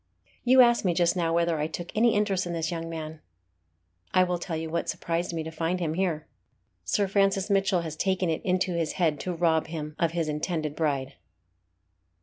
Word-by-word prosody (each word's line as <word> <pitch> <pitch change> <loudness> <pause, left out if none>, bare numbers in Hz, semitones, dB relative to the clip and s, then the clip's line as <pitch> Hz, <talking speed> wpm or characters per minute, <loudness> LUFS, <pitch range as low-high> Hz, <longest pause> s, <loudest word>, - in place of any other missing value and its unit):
You 255 +1 +7
asked 240 -1 +5
me 180 -3 +1
just 170 0 +3
now 170 -2 0
whether 170 -1 +1
I 150 - 0
took 170 +2 -6
any 230 +1 +4
interest 200 -3 +1
in 175 - -3
this 165 0 -2
young 165 -1 -4
man. 160 -1 -6 1.0
I 185 - +6
will 180 -1 -1
tell 170 -2 -4
you 160 0 -4
what 165 +1 -2
surprised 170 +1 -2
me 165 -1 -3
to 160 - -6
find 165 +3 -1
him 160 -3 -1
here. 165 -4 -1 0.6
Sir 200 -1 +1
Francis 195 0 +1
Mitchell 195 -2 +2
has 160 -2 -5
taken 190 +1 0
it 160 -1 -1
into 185 0 +1
his 165 -2 -1
head 160 -5 +1
to 180 - -3
rob 165 -2 +1
him 155 -2 -6
of 170 -1 +1
his 165 -2 -1
intended 150 0 -2
bride." 140 -4 -1
170 Hz, 200 wpm, -27 LUFS, 160-185 Hz, 1.0 s, You